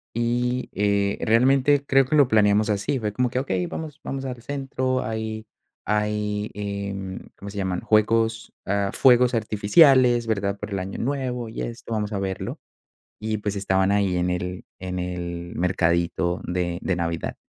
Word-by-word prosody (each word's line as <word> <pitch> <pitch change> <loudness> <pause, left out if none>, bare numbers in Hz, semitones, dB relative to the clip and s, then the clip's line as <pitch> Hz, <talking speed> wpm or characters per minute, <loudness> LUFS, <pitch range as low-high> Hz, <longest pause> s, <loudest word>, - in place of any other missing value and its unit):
y, 120 +2 0
eh, 100 0 +1
realmente 135 +5 +3
creo 135 -1 +4
que 140 - 0
lo 145 -3 +6
planeamos 105 -1 +3
así. 105 +6 -1
Fue 105 -2 -3
como 125 +3 +1
que: 125 - -4
"Okey, 95 -9 -1
vamos 155 -2 -6
vamos 135 0 -4
al 125 -2 -5
centro". 130 -1 -2
Hay 110 0 -4 0.4
hay, 105 0 -1
em, 100 -2 -4 0.2
¿cómo 100 - -9
se 100 - -9
llaman? 95 -2 -1
Juegos, 115 +1 +1
ah, 100 0 0
fuegos 125 -1 +5
artificiales, 120 +3 +4
¿verdad? 100 -2 -1
Por 105 - -6
el 100 - -1
Año 95 +1 -5
Nuevo 125 -3 -2
y - - -6
esto, 115 0 -6
vamos 105 -1 -2
a 100 - -1
verlo 95 -1 -4 0.6
y 110 0 -2
pues, 105 0 -3
estaban 95 0 +1
ahí 100 -3 +2
en 90 0 0
el 90 0 -3
en 90 0 -4
el 85 -1 -4
mercadito 85 0 +1
de 90 -1 -2
de 95 - 0
Navidad. 85 -1 -2
105 Hz, 165 wpm, -24 LUFS, 95-120 Hz, 0.6 s, lo